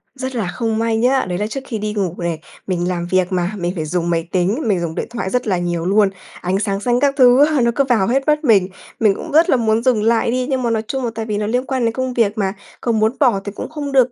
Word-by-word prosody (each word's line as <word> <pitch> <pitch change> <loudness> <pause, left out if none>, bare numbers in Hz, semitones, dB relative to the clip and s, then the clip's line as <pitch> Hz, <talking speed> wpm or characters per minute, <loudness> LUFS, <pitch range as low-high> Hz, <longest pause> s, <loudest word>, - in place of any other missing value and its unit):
Rất 260 -1 -5
là 220 -6 -1
không 225 -2 -1
may 225 0 +1
nhá, 255 +4 +2
đấy 180 - -2
là 210 +2 -1
trước 270 - -4
khi 230 - -3
đi 210 0 -3
ngủ 195 -5 -1
này, 170 -2 -3 0.3
mình 175 -2 -1
làm 175 -1 -2
việc 185 -1 +3
mà, 180 0 0
mình 175 -2 -2
phải 160 -3 -3
dùng 170 +2 -1
máy 165 0 -1
tính, 190 +7 +1
mình 195 -4 +2
dùng 165 -2 -3
điện - - -3
thoại 230 -5 -4
rất 250 +2 -1
là 190 -3 +1
nhiều 175 -1 -2
luôn, 200 +2 +3 0.3
ánh 185 +2 0
sáng 200 -2 -1
xanh 240 +3 +1
các 280 +1 +2
thứ 255 +1 +6
á 300 -3 +1
nó 235 0 +3
cứ 280 - +3
vào 235 -8 +2
hết 270 +4 0
mắt 300 +1 +2
mình. 205 -9 +4 0.3
Mình 215 -3 +4
cũng 320 - -7
rất 320 +3 +4
là - - +5
muốn 225 -1 +1
dừng 245 -5 +2
lại 230 +1 +2
đi, 255 +1 -1
nhưng 260 -2 0
mà 235 - +1
nói 220 -1 0
chung 265 -2 -2
là 235 - -2
tại 225 0 -3
vì 210 -2 -2
nó 210 0 -2
liên 250 +4 0
quan 260 -3 -1
đến 230 - 0
công 260 +1 -2
việc 220 -4 +1
mà, 195 -2 0 0.3
có 240 - 0
muốn 220 0 +2
bỏ 245 -9 +3
thì 205 - -4
cũng - - -7
không 290 -2 -5
được 255 -2 +4
225 Hz, 300 wpm, -18 LUFS, 190-250 Hz, 0.3 s, thứ